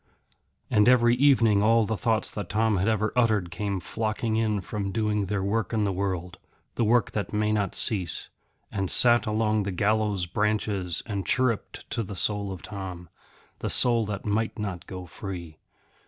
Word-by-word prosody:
And 105 +3 +5
every 120 -2 +5
evening 120 -6 +4
all 115 +1 +4
the 110 +2 -2
thoughts 110 0 0
that 100 -4 -6
Tom 110 -1 +1
had 95 +4 0
ever 110 -1 0
uttered 110 -8 +2
came 100 +1 -3
flocking 110 +4 -2
in 110 -2 +1
from 100 0 -4
doing 105 -2 0
their 100 0 -1
work 110 +4 -1
in 110 -2 +1
the 100 - 0
world, 90 -2 -3 0.3
the 120 - 0
work 115 0 +2
that 105 0 -4
may 105 0 +1
not 100 -3 -1
cease, 95 -8 0 0.4
and 95 -2 -2
sat 120 -1 +4
along 110 0 +1
the 100 0 -3
gallows 105 0 +1
branches 105 -2 -1
and 100 -4 -3
chirrupped 125 -4 -1
to - - -1
the 100 -2 -6
soul 100 +1 -1
of 95 -2 -8
Tom, 95 -4 -7 0.5
the - - -3
soul 120 -2 +5
that 105 -2 -5
might 110 +3 -1
not 100 -5 -5
go 90 -1 -7
free. 85 -4 -8
105 Hz, 175 wpm, -26 LUFS, 95-110 Hz, 0.5 s, And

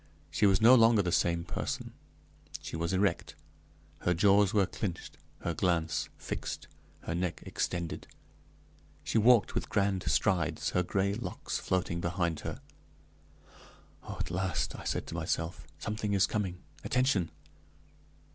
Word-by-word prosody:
She 105 - +3
was 95 -1 +4
no 115 +3 +8
longer 115 -4 +6
the 90 - -1
same 85 0 +2
person; 85 -1 -4 0.7
she - - -7
was 85 +1 -1
erect, 100 +1 0 0.6
her 90 - +1
jaws 100 +2 +5
were 100 -2 +3
clinched, 90 -2 -5 0.2
her 85 - -1
glance 85 -2 0
fixed, - - -5 0.3
her - - -4
neck 90 0 -2
extended; 85 -2 -3 1.0
she 115 - +1
walked 120 0 +5
with - - -2
grand 100 -2 +1
strides, 85 -6 +1
her 90 - +2
gray 95 +2 0
locks 115 +4 -4
floating 85 -2 -1
behind 85 -2 -1
her. - - -6 1.4
"Oh, - - -7
at - - -3
last," 95 -1 -1
I - - -9
said - - -1
to - - -8
myself, 80 +1 -2
"something 105 -1 -2
is 100 -1 +4
coming, 95 -4 -3 0.2
attention!" 125 -9 +2
95 Hz, 135 wpm, -31 LUFS, 85-105 Hz, 1.4 s, no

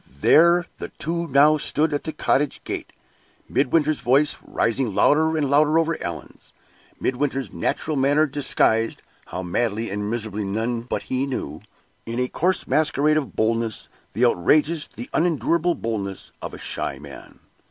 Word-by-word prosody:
There 170 +2 +5
the - - -5
two 170 +1 -4
now 150 +2 +5
stood 150 +2 +1
at 145 - -2
the 160 - -2
cottage 145 -1 0
gate - - -5 0.6
Midwinter's 150 +2 +1
voice 140 +4 +2
rising 115 -2 -1
louder 160 +2 +3
and 150 -2 +1
louder 150 +3 +3
over 165 0 +1
Allan's - - -8 0.5
Midwinter's 135 +1 -2
natural 155 - -1
manner 145 +3 +3
disguised 130 -5 0 0.2
(how 90 - -5
madly 110 +4 -1
and 105 +1 -3
miserably 110 -2 -3
none 115 +4 -2
but 120 - -4
he 130 +2 -2
knew!) 135 - -5 0.5
in 115 +2 -3
a 125 - +1
coarse 180 +8 0
masquerade 150 -1 +2
of 150 -3 -2
boldness 115 0 -1 0.2
the 125 - +2
outrageous, 150 - +2
the 120 +3 -9
unendurable 170 +1 +1
boldness 100 -4 -4
of - - -6
a - - -9
shy - - -4
man. - - -12
140 Hz, 150 wpm, -23 LUFS, 115-155 Hz, 0.6 s, There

